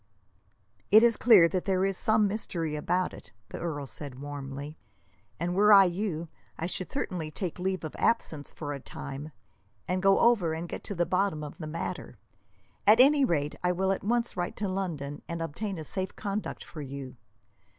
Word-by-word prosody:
"It 215 +2 +8
is 235 -1 +5
clear 210 -8 +7
that 185 0 -2
there 190 -1 +2
is 195 0 0
some 215 +2 +3
mystery 170 -7 -2
about 180 +4 0
it," - - -12 0.2
the - - -7
earl 150 -4 -3
said 135 -1 -6
warmly, 145 +1 -6 0.6
"and 175 +2 -1
were 210 +3 +5
I 200 -1 +10
you, 175 -2 -2 0.3
I 165 - -3
should 185 +1 -2
certainly 180 - -3
take 175 +3 -5
leave 185 0 -1
of 155 - -6
absence, 160 -10 0
for 145 -2 -5
a 140 - -5
time, 140 +3 -8 0.6
and 185 +1 0
go 195 0 +5
over 210 -9 +4
and 165 +2 -5
get - - -6
to 200 - -3
the 175 0 +1
bottom 185 -4 0
of 150 - -8
the 155 - -5
matter. 165 +2 -5 0.7
At 215 +3 +7
any 280 +2 +6
rate, 150 - +1
I 180 0 +2
will 190 +2 +1
at 195 - -2
once 235 +3 0
write 175 -1 -3
to 210 - -2
London 165 -7 -3
and 170 -1 -4
obtain 185 +5 -4
a 160 - -5
safe 190 +4 -3
conduct 205 0 -4
for 155 - -9
you. 135 -2 -7
180 Hz, 190 wpm, -29 LUFS, 155-200 Hz, 0.7 s, I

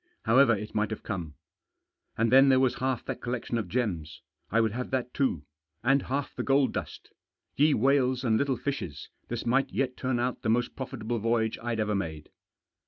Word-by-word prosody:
However 120 0 +5
it 105 +1 -7
might 105 0 0
have 110 - -6
come. 85 -8 -5 0.8
And 115 0 +2
then 135 +1 +7
there 130 -1 +5
was 130 -1 +1
half 130 -2 -1
that - - -5
collection 120 -1 -2
of 105 - -4
gems 95 -11 -2
— - - -48
I 115 - +3
would 110 -2 +2
have 125 +3 -4
that 125 -1 -2
too. 85 - 0 0.4
And 135 0 +4
half 135 +2 -3
the - - -4
gold 135 0 +2
dust - - -6 0.4
Ye 150 +1 +4
whales 130 0 +2
and 115 -3 +2
little 135 +2 +1
fishes! 120 - -4 0.2
this 120 -1 -4
might 130 +3 +2
yet 130 -2 -1
turn 130 -2 -1
out 125 +1 -1
the 110 - -1
most 120 +2 +1
profitable 120 -3 -4
voyage 110 0 0
I'd 120 -1 -2
ever 105 -1 0
made. 80 -6 -4
120 Hz, 195 wpm, -28 LUFS, 110-130 Hz, 0.8 s, then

